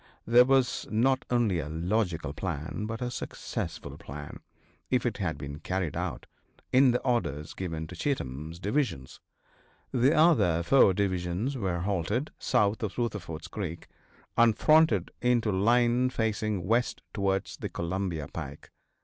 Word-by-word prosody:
There 120 +2 +6
was 135 -1 +2
not 130 +4 +2
only 115 -8 +2
a 75 -1 -4
logical 85 -2 -1
plan 85 +4 -4
but 115 +2 -4
a 120 - -2
successful - - -5
plan, 70 +1 -8 0.5
if - - +1
it - - -1
had - - -2
been 70 +1 -7
carried 90 -4 -2
out, - - -3 0.5
in 130 +1 +6
the 125 0 +2
orders 75 - -1
given 80 -4 -4
to - - -9
Cheatham's 80 - -3
divisions. 100 - -2 0.7
The 130 +5 +3
other 145 - +4
four 95 -2 +5
divisions 95 +5 -1
were 95 -8 -1
halted 100 - -1
south 105 +3 +1
of 105 -4 -3
Rutherford's 90 -9 -3
creek, 85 -6 -6 0.5
and 115 -2 +4
fronted 155 - +4
into 120 -3 +2
line 120 +5 +3
facing 110 -5 -1
west 115 +5 0
towards 95 -2 -1
the - - -5
Columbia 85 -3 -3
pike. - - -8
100 Hz, 140 wpm, -29 LUFS, 85-120 Hz, 0.7 s, There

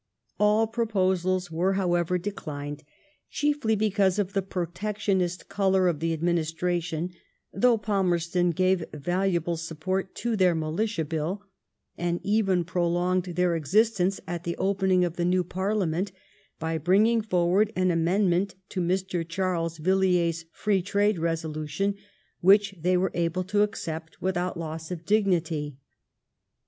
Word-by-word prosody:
All 210 +2 +4
proposals 185 -5 0
were, 180 +4 +1
however, 180 -2 +1
declined^ 150 -6 -5 0.5
chiefly 290 -7 +1
because 200 -3 +2
of 200 -2 -1
the 195 - +1
Protectionist 185 0 -2
colour 190 -2 +2
of 165 -4 0
the 165 +1 0
ad 160 0 -3
ministration, 170 0 -1 0.4
though 235 +4 +4
Palmerston 180 -4 +1
gave 185 +1 +2
valuable 175 +1 0
support 165 +4 -3
to 235 -1 -1
their 185 -4 +3
Militia 165 +3 -1
Bill, 165 +6 -3 0.6
and 175 0 -1
even 195 -3 +2
prolonged 175 +1 0
their 180 -1 0
existence 195 - +2
at 170 -1 -4
the 170 -1 -3
opening 190 -2 +2
of 175 -1 -5
the 175 - 0
new 180 +1 +2
Parliament 190 0 -1 0.5
by 160 0 -2
bringing 210 +8 +3
forward 190 +1 +2
an 185 0 +2
amendment 180 +2 +1
to 185 - -2
Mr. 185 0 -1
Charles 165 -1 -2
Villiers' 175 -1 +1
free 200 0 0
trade 205 +2 +1
reso* 165 -1 -2
lution 155 +7 -2 0.4
which 200 +2 +5
they 180 +2 +3
were 185 +1 +1
able 170 +1 0
to 205 +3 +1
accept 165 -6 -3
without 180 -1 -1
loss 160 -1 -5
of 170 -2 -6
dignity. 170 -9 +1
180 Hz, 135 wpm, -26 LUFS, 170-195 Hz, 0.6 s, which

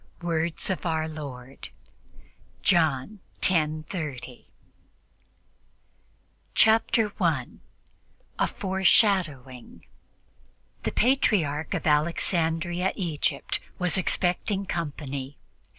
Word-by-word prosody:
Words 165 +1 0
of 185 - -3
Our 160 -2 0
Lord 135 -4 -8 0.9
(John 165 +2 +2 0.2
10:30) 155 -6 -1 2.1
Chapter 220 0 +4
1 165 - -1 0.8
A - - +3
FORESHADOWING 185 - +1 1.0
THE - - -2
Patriarch 180 - +2
of - - -3
Alexandria, 170 +3 +1
Egypt 165 -4 -1 0.2
was 180 -1 +1
expecting 190 +1 0
company. 145 -5 -4
165 Hz, 70 wpm, -26 LUFS, 145-185 Hz, 2.1 s, Chapter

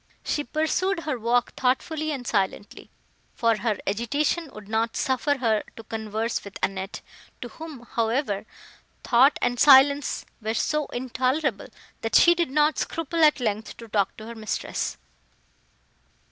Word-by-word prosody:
She 295 - -1
pursued 320 +6 0
her 300 -6 -3
walk 235 +2 +1
thoughtfully 305 +5 0
and 265 -4 -5
silently, 205 -2 -2 0.5
for 230 -2 +2
her 215 -2 -1
agitation 285 - -1
would 215 -4 -11
not 225 +1 -1
suffer 275 +2 +1
her 225 -4 +1
to 225 - -10
converse 220 +1 -3
with 200 -1 -9
Annette, 195 0 -3 0.4
to 245 - -6
whom, 315 -4 -9
however, 230 -2 -1 0.6
thought 265 +4 +5
and 245 0 0
silence 280 0 +5 0.2
were 220 +1 -2
so 300 +3 0
intolerable, 255 0 -1 0.3
that 225 - -2
she 345 - +7
did 340 -3 -1
not 300 +2 +2
scruple 330 0 -1
at 300 -2 +5
length 220 -2 -3
to 230 - -10
talk 205 -3 0
to 215 - -9
her 230 - -7
mistress. 220 -2 -3
245 Hz, 145 wpm, -25 LUFS, 220-295 Hz, 0.6 s, she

